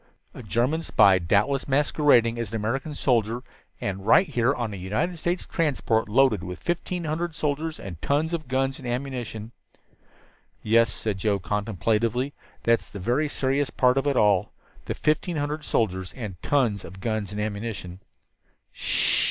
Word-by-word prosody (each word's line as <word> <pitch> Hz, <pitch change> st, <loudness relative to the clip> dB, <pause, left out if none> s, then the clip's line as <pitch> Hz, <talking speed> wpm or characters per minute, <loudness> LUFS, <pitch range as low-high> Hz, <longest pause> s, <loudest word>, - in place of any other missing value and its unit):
"A -, -, -9 dB
German 120 Hz, -, 0 dB
spy, 95 Hz, -, +5 dB
doubtless 105 Hz, +10 st, +1 dB
masquerading 135 Hz, -4 st, +3 dB
as 115 Hz, -4 st, -3 dB
an 115 Hz, -, -6 dB
American 130 Hz, +8 st, -2 dB
soldier, 120 Hz, -2 st, +1 dB, 0.4 s
and 95 Hz, -1 st, -3 dB
right 180 Hz, -, +5 dB
here 120 Hz, +2 st, +2 dB
on 120 Hz, -6 st, -3 dB
a -, -, -4 dB
United 105 Hz, -, -2 dB
States 175 Hz, +3 st, -1 dB
transport 130 Hz, -, 0 dB
loaded 115 Hz, -4 st, +3 dB
with 90 Hz, -1 st, -6 dB
fifteen 175 Hz, +1 st, -2 dB
hundred 160 Hz, +1 st, -2 dB
soldiers 155 Hz, +1 st, -2 dB
and 85 Hz, -5 st, -8 dB
tons 155 Hz, +4 st, 0 dB
of 155 Hz, -4 st, -3 dB
guns 135 Hz, +1 st, 0 dB
and 125 Hz, -, -7 dB
ammunition." 120 Hz, -3 st, -4 dB, 1.1 s
"Yes," 115 Hz, 0 st, +4 dB
said 105 Hz, -2 st, -3 dB
Joe 100 Hz, +1 st, +1 dB
contemplatively, 110 Hz, +7 st, -1 dB, 0.3 s
"that's 115 Hz, 0 st, +2 dB
the -, -, -8 dB
very 125 Hz, +10 st, +1 dB
serious 135 Hz, 0 st, 0 dB
part 125 Hz, -1 st, +3 dB
of 135 Hz, +1 st, 0 dB
it 140 Hz, -3 st, +1 dB
all 105 Hz, -1 st, +3 dB, 0.3 s
the -, -, -3 dB
fifteen 155 Hz, +2 st, 0 dB
hundred 150 Hz, +1 st, -2 dB
soldiers 95 Hz, -9 st, -1 dB
and 105 Hz, -8 st, -7 dB
tons 120 Hz, -9 st, +1 dB
of 95 Hz, +3 st, -10 dB
guns 110 Hz, -1 st, -2 dB
and 105 Hz, -, -5 dB
ammunition." 100 Hz, -4 st, -4 dB
120 Hz, 155 wpm, -25 LUFS, 105-145 Hz, 1.1 s, spy